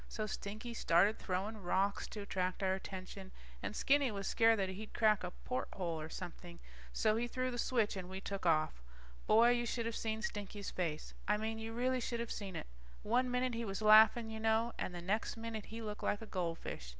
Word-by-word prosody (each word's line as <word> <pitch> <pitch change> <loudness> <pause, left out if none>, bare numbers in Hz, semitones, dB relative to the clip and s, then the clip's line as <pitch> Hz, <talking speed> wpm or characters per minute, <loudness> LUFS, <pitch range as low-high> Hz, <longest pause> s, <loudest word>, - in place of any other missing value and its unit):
So 215 - -3
Stinky 215 +3 -5
started 200 0 +3
throwing 200 +3 -2
rocks 195 +2 +1
to 210 - -6
attract 185 -1 -2
our 190 0 +3
attention, 190 0 -7 0.3
and 215 - -4
Skinny 280 -1 +3
was 200 -3 -4
scared 225 +1 +4
that 190 -2 0
he'd 210 +3 -7
crack 215 -3 +4
a 180 - -2
porthole 180 -7 -4
or 155 - -6
something, 175 0 -8 0.3
so 215 - +2
he 240 +1 0
threw 255 +1 -1
the 245 - -4
switch 230 -4 +1
and 185 -2 -5
we 190 0 -5
took 195 0 -5
off. 155 - +2 0.5
Boy, 230 +3 +7
you 240 -1 +1
should 235 0 -2
of 230 0 -2
seen 220 -1 -2
Stinky's 205 -1 -4
face. 160 -4 -3
I 210 +1 +3
mean 220 +1 -3
you 225 0 -5
really 255 +2 +1
should 235 0 -2
of 235 - -3
seen 195 -4 -5
it. - - -4 0.4
One 250 +4 +2
minute 250 0 0
he 230 0 -2
was 200 0 -3
laughing 220 +1 +7
you 220 - -5
know, 225 +1 +2
and 180 - -3
the 175 - -6
next 210 +5 -1
minute 225 -2 -5
he 225 +1 -6
looked 210 -1 -5
like 205 - 0
a - - -7
goldfish. 165 - -4
215 Hz, 210 wpm, -36 LUFS, 190-230 Hz, 0.5 s, Boy